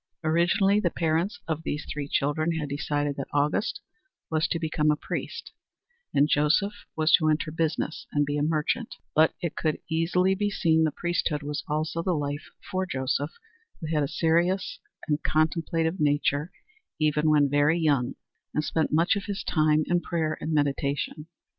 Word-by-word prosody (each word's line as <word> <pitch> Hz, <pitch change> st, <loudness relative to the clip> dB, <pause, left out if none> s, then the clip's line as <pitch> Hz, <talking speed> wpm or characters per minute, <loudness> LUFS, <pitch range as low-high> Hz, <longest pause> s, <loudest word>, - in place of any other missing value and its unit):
Originally 175 Hz, +5 st, +3 dB
the 180 Hz, -, +1 dB
parents 165 Hz, +4 st, 0 dB
of 160 Hz, -1 st, -2 dB
these 150 Hz, -2 st, -3 dB
three 145 Hz, -2 st, -4 dB
children 155 Hz, +4 st, 0 dB
had 155 Hz, -2 st, -2 dB
decided 145 Hz, 0 st, -1 dB
that 135 Hz, -, -4 dB
Auguste 145 Hz, +7 st, 0 dB, 0.5 s
was 155 Hz, 0 st, +2 dB
to -, -, -1 dB
become 155 Hz, -2 st, 0 dB
a 150 Hz, -, +4 dB
priest -, -, -5 dB, 0.6 s
and 140 Hz, +1 st, +4 dB
Joseph 155 Hz, +8 st, +2 dB, 0.2 s
was 155 Hz, 0 st, +2 dB
to 155 Hz, -2 st, +5 dB
enter 155 Hz, 0 st, 0 dB
business 160 Hz, 0 st, -2 dB
and 145 Hz, 0 st, +2 dB
be 145 Hz, +1 st, -2 dB
a 145 Hz, -, 0 dB
merchant, 155 Hz, +10 st, 0 dB, 0.2 s
but 155 Hz, +1 st, +4 dB
it 170 Hz, -, -2 dB
could 155 Hz, -2 st, 0 dB
easily 180 Hz, +3 st, +2 dB
be 205 Hz, +2 st, 0 dB
seen 160 Hz, -5 st, +2 dB
the 155 Hz, -, +1 dB
priesthood 170 Hz, -2 st, -1 dB
was 145 Hz, 0 st, -3 dB
also 155 Hz, +2 st, -1 dB
the 180 Hz, 0 st, 0 dB
life 145 Hz, 0 st, -3 dB, 0.2 s
for 185 Hz, 0 st, -1 dB
Joseph, 140 Hz, +1 st, -1 dB, 0.5 s
who 160 Hz, 0 st, -4 dB
had 150 Hz, -, +2 dB
a 140 Hz, -, +1 dB
serious 170 Hz, +5 st, +1 dB, 0.3 s
and 150 Hz, -1 st, 0 dB
contemplative 160 Hz, +2 st, 0 dB
nature 145 Hz, +2 st, +1 dB, 0.5 s
even 155 Hz, 0 st, +2 dB
when 150 Hz, -2 st, +5 dB
very 145 Hz, +3 st, +3 dB
young, 140 Hz, -6 st, +1 dB, 0.4 s
and 150 Hz, -, +1 dB
spent 160 Hz, 0 st, 0 dB
much 165 Hz, +5 st, +3 dB
of 200 Hz, -, -3 dB
his 200 Hz, -1 st, -4 dB
time 155 Hz, -1 st, +2 dB
in 175 Hz, 0 st, +1 dB
prayer 160 Hz, -2 st, -1 dB
and 160 Hz, -, -3 dB
meditation. 145 Hz, +1 st, -1 dB
155 Hz, 170 wpm, -27 LUFS, 150-165 Hz, 0.6 s, to